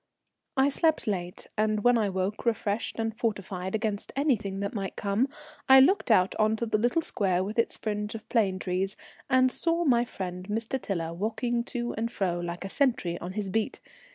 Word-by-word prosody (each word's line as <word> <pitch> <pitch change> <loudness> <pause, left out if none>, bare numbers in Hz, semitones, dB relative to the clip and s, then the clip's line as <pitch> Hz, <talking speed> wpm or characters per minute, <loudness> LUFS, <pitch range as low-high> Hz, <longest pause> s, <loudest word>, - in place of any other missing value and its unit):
I 265 +1 +5
slept 315 +2 +1
late, 180 -4 -3
and 215 -1 +1
when 245 0 +5
I 215 -3 +2
woke, 190 +2 -2
refreshed 225 -2 -1
and 225 -1 -2
fortified 195 -4 -2
against 215 -2 -2
anything 220 -9 0
that 200 - -2
might 195 -3 -4
come, 205 +6 +1 0.4
I 265 0 +10
looked 325 +4 +4
out 190 -4 +4
on 215 0 +3
to 235 - -2
the 215 -2 +1
little 245 +9 +2
square 185 -7 +1
with 210 +4 -3
its 230 - +1
fringe 210 0 -3
of 220 - -8
plane 200 -6 +2
trees, 190 +1 -2 0.3
and 255 -1 +4
saw 335 +3 0
my 240 -4 +4
friend 180 -4 -6
Mr. 225 +4 -2
Tiler 165 -4 -3
walking 230 +5 -1
to 240 -1 -3
and 230 +2 -2
fro 180 -6 -1
like 175 +1 -4
a - - -2
sentry 230 -10 +1
on 180 +2 -6
his 200 -2 -3
beat. 220 +1 -1
215 Hz, 190 wpm, -28 LUFS, 190-240 Hz, 0.4 s, I